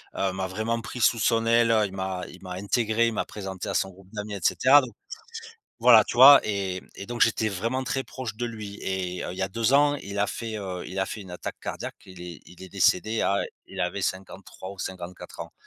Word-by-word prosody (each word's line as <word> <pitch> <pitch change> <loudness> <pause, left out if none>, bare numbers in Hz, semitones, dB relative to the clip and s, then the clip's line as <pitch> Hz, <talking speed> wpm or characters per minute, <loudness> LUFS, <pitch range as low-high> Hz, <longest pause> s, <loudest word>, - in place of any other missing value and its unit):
m'a 95 0 -1
vraiment 110 +5 -2
pris 125 +1 -7
sous 115 0 +3
son 115 0 +2
aile, 115 0 +4
il 95 - -6
m'a 95 -1 -3
il 90 - -13
m'a 90 -1 -7
intégré, 110 +4 +1
il 115 - -1
m'a - - -1
présenté 95 -3 -6
à - - -2
son 95 - +1
groupe 95 +1 -18
d'amis 105 0 -5
et - - -5
cetera 140 +3 +6
don 130 - -6 0.9
voilà, 115 -2 +8
tu - - -5
vois 140 +2 +11
et 95 -3 -2
et 100 - -7
donc 120 0 -5
j'étais 110 -1 +3
vraiment 115 +7 -2
très 135 +1 -2
proche 120 -5 -6
de 120 - -3
lui 105 -3 -7
et 90 -1 -3
il 90 - -7
y - - -3
a - - 0
2 115 +5 0
ans, 145 +1 +5
il 100 -6 -7
a 100 - +3
fait, 110 +1 -5
heu, 95 -3 -5
il 95 - -7
a 95 - +1
fait 105 - -6
une 95 - -12
attaque 90 - -6
cardiaque, - - -5
il 95 -1 -13
est 85 -2 -8
il 90 +1 -13
est 95 - -10
décédé 100 +3 +2
à 100 - +2 0.3
il - - -9
avait 90 +3 -2
53 95 0 -5
ou 100 - -13
54 90 -1 -7
ans - - -9
100 Hz, 235 wpm, -26 LUFS, 95-115 Hz, 0.9 s, vois